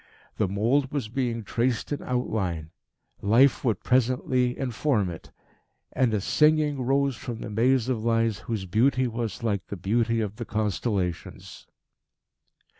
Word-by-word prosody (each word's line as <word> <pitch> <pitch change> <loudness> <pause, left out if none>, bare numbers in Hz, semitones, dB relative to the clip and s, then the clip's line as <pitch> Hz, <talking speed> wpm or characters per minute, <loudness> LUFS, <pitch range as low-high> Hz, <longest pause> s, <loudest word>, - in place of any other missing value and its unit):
The 105 - +1
mould 120 +8 +1
was 135 -7 -3
being 120 -2 -2
traced 120 +4 -1
in 145 - -2
outline. 95 -10 -2 0.5
Life 120 +7 +4
would 115 -7 0
presently 125 0 +1
inform 120 -6 0
it. 80 - -10 0.6
And 125 -3 +2
a 105 - +1
singing 150 +3 +2
rose 135 +1 +1
from 115 +2 -6
the - - -6
maze 125 +3 +2
of 120 -4 -1
lines 115 -2 +1
whose 110 -5 -4
beauty 130 +7 +2
was 115 -1 -4
like 100 -5 -1
the 100 - -6
beauty 115 +5 +1
of 105 -1 -3
the - - -5
constellations. 105 -4 -3
115 Hz, 140 wpm, -26 LUFS, 105-130 Hz, 0.6 s, Life